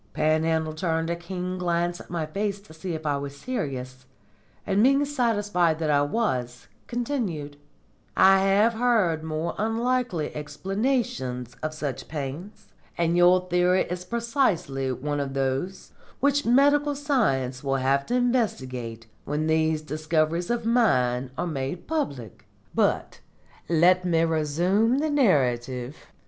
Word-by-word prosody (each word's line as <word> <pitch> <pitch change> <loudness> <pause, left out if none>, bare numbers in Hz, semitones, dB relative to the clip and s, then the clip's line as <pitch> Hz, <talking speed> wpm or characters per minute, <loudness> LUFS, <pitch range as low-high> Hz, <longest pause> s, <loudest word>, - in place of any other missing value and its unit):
Panhandle 160 0 +1
turned 165 0 -1
a - - 0
keen 180 +1 -5
glance 175 0 -1
at - - -15
my 170 -2 -2
face 200 +5 -2
to 200 -5 -16
see 165 +2 -5
if 160 0 -7
I 145 -1 +1
was 140 0 -6
serious, 130 - -5 0.6
and, 200 0 +2
being 275 +4 +4
satisfied 205 - +1
that 160 -2 0
I 145 -1 +4
was, 130 - -1 0.2
continued: 225 - -3 0.6
"I 195 0 +7
have 200 +4 +3
heard 220 -9 +2
more 160 +1 -3
unlikely 225 -6 -1
explanations 150 - -2
of 155 0 -3
such 145 -4 -4
pains, 150 +7 -6 0.3
and 170 0 +1
your 180 +1 +5
theory 180 +1 +3
is 180 0 -3
precisely 180 - 0
one 145 +3 -3
of 135 -1 -3
those 135 +8 -2 0.3
which 285 0 +2
medical 285 +3 +4
science 140 - 0
will 135 -1 0
have 135 +1 +1
to 245 - 0
investigate 130 - -1 0.2
when 150 +2 -1
these 160 -1 +1
discoveries 155 +2 -1
of 235 -1 -1
mine 130 - +2
are - - -1
made 140 0 -4
public. 140 - -4 0.3
But - - 0 0.5
let 175 +2 +4
me 165 -2 +2
resume 170 - +2
the 305 +2 0
narrative. 130 - +1
170 Hz, 135 wpm, -25 LUFS, 145-215 Hz, 0.6 s, I